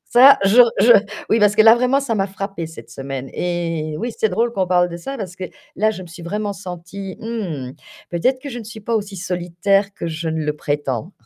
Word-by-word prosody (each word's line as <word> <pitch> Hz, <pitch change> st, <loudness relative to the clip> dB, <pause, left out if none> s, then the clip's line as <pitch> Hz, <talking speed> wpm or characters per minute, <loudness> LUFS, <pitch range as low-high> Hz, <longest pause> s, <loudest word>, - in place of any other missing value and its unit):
Ça, 270 Hz, +3 st, +7 dB
je 215 Hz, +6 st, +7 dB, 0.2 s
je 235 Hz, +4 st, +8 dB, 0.4 s
oui, 225 Hz, -, +4 dB
parce 210 Hz, 0 st, +4 dB
que 220 Hz, -, +7 dB
là, 225 Hz, +1 st, +8 dB
vraiment, 250 Hz, +3 st, +2 dB
ça 250 Hz, -5 st, -2 dB
m'a 195 Hz, -2 st, +1 dB
frappé 195 Hz, -3 st, -5 dB
cette 160 Hz, -, -12 dB
semaine, 135 Hz, -1 st, -6 dB
eh 165 Hz, -3 st, -2 dB
oui, 235 Hz, +2 st, -3 dB
c'est 220 Hz, -, +2 dB
drôle 230 Hz, +6 st, 0 dB
qu'on 190 Hz, -5 st, 0 dB
parle 180 Hz, -1 st, +3 dB
de 170 Hz, -, -5 dB
ça 270 Hz, +11 st, -6 dB
parce 185 Hz, -4 st, -6 dB
que 190 Hz, -, -5 dB, 0.3 s
là, 215 Hz, +3 st, +3 dB
je 190 Hz, -, -8 dB
me -, -, -10 dB
suis 170 Hz, +1 st, -11 dB
vraiment 205 Hz, +4 st, -3 dB
sentie, 185 Hz, +1 st, -8 dB
mmh, 185 Hz, -, -4 dB, 0.4 s
peut-être 255 Hz, +10 st, +1 dB
que 280 Hz, -, -7 dB
je 245 Hz, -, -5 dB
ne -, -, -9 dB
suis 220 Hz, +1 st, -9 dB
pas 230 Hz, +3 st, -2 dB
aussi 200 Hz, -2 st, -4 dB
solitaire 180 Hz, +3 st, 0 dB
que -, -, -5 dB
je 160 Hz, 0 st, -4 dB
ne 160 Hz, 0 st, -2 dB
le 150 Hz, -, 0 dB
prétends! 145 Hz, -, -3 dB
195 Hz, 230 wpm, -20 LUFS, 170-220 Hz, 0.4 s, je